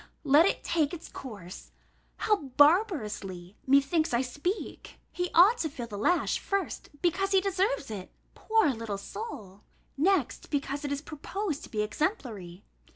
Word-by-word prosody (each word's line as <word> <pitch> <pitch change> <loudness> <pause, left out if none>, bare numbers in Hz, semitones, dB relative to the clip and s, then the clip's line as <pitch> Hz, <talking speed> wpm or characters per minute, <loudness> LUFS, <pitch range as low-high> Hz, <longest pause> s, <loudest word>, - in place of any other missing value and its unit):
let 300 +4 +6
it - - -1
take 320 -1 +1
its 335 - -10
course! 200 -9 -9 0.4
How 425 -1 +2 0.2
barbarously, 215 - +2
methinks, 280 +2 +3
I 240 - +2
speak! 290 - -4
He 355 0 -2
ought 395 +8 +7
to 315 - -1
feel 250 -4 -6
the 220 -3 -8
lash, 345 - +1
first, 395 -1 -3
because 390 +3 +1
he 385 - +6
deserves 370 - 0
it, 195 -4 -6 0.2
poor 440 -7 +2
little 225 -3 -4
soul? 205 - -8 0.4
Next, 345 -2 +1
because 285 0 -2
it 285 - -3
is 285 +1 -2
proposed 320 +1 -4
to - - -15
be 210 -1 -1
exemplary. 210 - -3
290 Hz, 150 wpm, -29 LUFS, 225-360 Hz, 0.4 s, ought